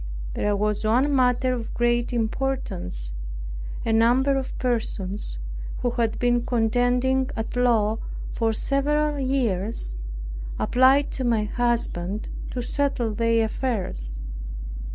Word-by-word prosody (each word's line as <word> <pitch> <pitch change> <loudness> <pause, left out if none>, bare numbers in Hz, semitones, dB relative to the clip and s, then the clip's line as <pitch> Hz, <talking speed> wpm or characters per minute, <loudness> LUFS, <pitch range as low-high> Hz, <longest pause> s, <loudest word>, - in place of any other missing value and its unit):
There 205 0 +1
was 210 +1 0
one 255 +7 +3
matter 255 0 +3
of 235 -2 -4
great 240 0 +2
importance. 220 - -2 0.7
A 225 - +2
number 245 +5 +4
of 265 -1 -3
persons, 210 - -2 0.5
who 245 - +2
had 230 -2 0
been 240 -1 +2
contending 245 +3 +2
at 225 +2 -4
law 225 -3 +3 0.3
for 225 -1 +1
several 290 +5 +1
years, 230 - +1 0.6
applied 265 +3 +4
to 260 - -2
my 230 -3 +2
husband 210 -4 -1 0.2
to 245 - -3
settle 255 -4 0
their 230 +1 +2
affairs. 190 - -2
240 Hz, 110 wpm, -25 LUFS, 215-260 Hz, 0.7 s, number